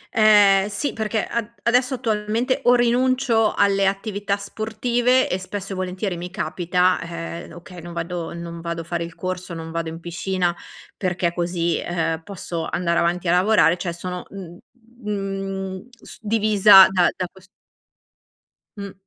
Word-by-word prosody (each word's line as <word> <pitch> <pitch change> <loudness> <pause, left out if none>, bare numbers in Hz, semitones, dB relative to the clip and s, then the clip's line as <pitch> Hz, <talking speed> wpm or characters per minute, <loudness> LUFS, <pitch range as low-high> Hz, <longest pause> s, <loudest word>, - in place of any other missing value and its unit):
Ehm, 205 -2 +6
sì, 210 +8 -2
perché 220 0 -1
ad 235 -1 -3
adesso 250 +2 +2
attualmente 230 +3 -1
o 245 - +6
rinuncio 245 -1 +2
alle 195 -1 +3
attività 200 0 -2
sportive, 235 +5 0
e 185 - -2
spesso 195 +1 -6
e - - -5
volentieri 185 0 -3
mi 175 +1 -6
capita, 180 +1 0
ehm, 170 0 -7
okay, 175 0 -11
non 170 0 -9
vado 170 0 -4
non 170 0 -7
vado 170 0 -4
fare 170 0 -3
il 170 0 -9
corso, 185 -1 -5
non 165 0 -7
vado 165 -1 -3
in 165 +1 -8
piscina, 175 +1 -2 0.4
perché 175 -2 -1
così, 170 -1 -1
ehm, 165 -2 -2
posso 170 -3 -5
andare 170 -1 0
avanti 175 +1 0
a - - +3
lavorare, 180 -3 +4
cioè 175 -1 -3
sono, 180 +1 -6
uhm, 180 -3 -10 0.4
mhmm, 195 0 -4
s 235 -3 -11
divisa 210 -3 +7
da 180 -2 +3
da 185 - -2
ques 190 0 -18 1.3
Mh. 200 -1 -7
190 Hz, 150 wpm, -22 LUFS, 175-210 Hz, 1.3 s, divisa